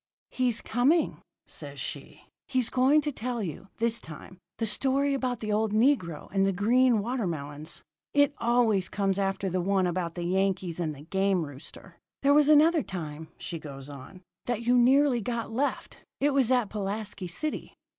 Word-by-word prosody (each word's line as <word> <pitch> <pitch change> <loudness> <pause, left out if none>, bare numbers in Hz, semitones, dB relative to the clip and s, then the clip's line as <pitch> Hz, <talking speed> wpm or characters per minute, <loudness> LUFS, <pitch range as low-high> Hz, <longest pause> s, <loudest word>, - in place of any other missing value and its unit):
"'He's 245 -3 +1
coming,' 275 +8 +1 0.2
says - - -7
she. - - -7 0.2
'He's 255 -3 0
going 265 +4 +4
to 295 - -2
tell 245 -3 -3
you, 180 +2 -6
this 230 0 +1
time, 165 +3 -11 0.2
the 225 - -1
story 275 +5 +1
about 255 -2 -2
the 215 -1 -2
old 215 0 +1
negro 215 - +1
and 195 -1 +3
the 195 - +3
green 230 +3 +3
watermelons. 160 - -4 0.3
It 285 0 +3
always 230 -5 +2
comes 195 -1 0
after 195 0 -1
the 185 0 -1
one 190 +1 +2
about 175 -1 -2
the 175 - -4
Yankees 185 -2 0
and 155 -3 -2
the 140 - -12
game 190 0 +1
rooster. 145 0 -12 0.2
There 280 +1 +5
was 295 0 +5
another 310 +2 +6
time,' 160 - -6
she 165 - -5
goes 140 -2 -9
on, 145 +7 -11 0.2
'that 240 -2 -1
you 245 +2 +3
nearly 255 +1 +4
got 230 +1 -3
left 275 +5 -2 0.2
it 290 0 +2
was 265 -4 +3
at 250 -5 +2
Pulaski 205 -2 -4
City.' 300 - -5
215 Hz, 170 wpm, -28 LUFS, 180-255 Hz, 0.3 s, another